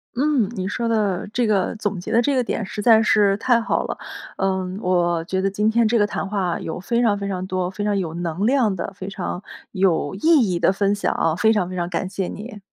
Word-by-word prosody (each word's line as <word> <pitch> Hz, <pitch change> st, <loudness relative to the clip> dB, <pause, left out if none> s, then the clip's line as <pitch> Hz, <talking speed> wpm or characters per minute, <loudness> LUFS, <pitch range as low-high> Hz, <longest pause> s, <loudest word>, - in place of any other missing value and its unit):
嗯， 265 Hz, -5 st, +2 dB
你 185 Hz, -2 st, -3 dB
说 230 Hz, +3 st, -2 dB
的 210 Hz, -5 st, 0 dB
这 240 Hz, +1 st, +1 dB
个 205 Hz, -2 st, +1 dB
总 205 Hz, -3 st, -3 dB
结 -, -, -6 dB
的 230 Hz, -, +4 dB
这 275 Hz, +3 st, +1 dB
个 255 Hz, -, +2 dB
点 230 Hz, -2 st, -3 dB
实 210 Hz, -, -5 dB
在 225 Hz, 0 st, +6 dB
是 205 Hz, -2 st, +3 dB
太 235 Hz, 0 st, +2 dB
好 -, -, 0 dB
了。 -, -, -4 dB, 0.4 s
呃， 190 Hz, 0 st, +1 dB, 0.2 s
我 175 Hz, -3 st, +1 dB
觉 190 Hz, +2 st, -2 dB
得 195 Hz, +1 st, +1 dB
今 210 Hz, +2 st, +1 dB
天 230 Hz, 0 st, +3 dB
这 230 Hz, 0 st, +2 dB
个 205 Hz, -, +3 dB
谈 200 Hz, -, -3 dB
话 190 Hz, -4 st, -1 dB
有 160 Hz, -, -5 dB
非 235 Hz, +6 st, 0 dB
常 215 Hz, -4 st, +2 dB
非 200 Hz, 0 st, -4 dB
常 185 Hz, -1 st, -3 dB
多、 185 Hz, -1 st, -2 dB
非 205 Hz, +2 st, -5 dB
常 205 Hz, -1 st, +1 dB
有 170 Hz, -4 st, -3 dB
能 175 Hz, +3 st, -2 dB
量 245 Hz, -7 st, +2 dB
的、 180 Hz, -, -4 dB
非 190 Hz, -1 st, -7 dB
常 190 Hz, -1 st, -5 dB, 0.3 s
有 185 Hz, -5 st, +1 dB
意 -, -, -8 dB, 0.3 s
义 175 Hz, -, -1 dB
的 190 Hz, -, +3 dB
分 200 Hz, +1 st, +1 dB
享 200 Hz, -, -1 dB
啊， 160 Hz, -1 st, +1 dB
非 220 Hz, +4 st, +3 dB
常 195 Hz, -5 st, 0 dB
非 185 Hz, -, -6 dB
常 175 Hz, -1 st, -2 dB
感 180 Hz, +2 st, -2 dB
谢 190 Hz, -2 st, -3 dB
你。 215 Hz, 0 st, -8 dB
200 Hz, 265 characters per minute, -22 LUFS, 185-220 Hz, 0.4 s, 在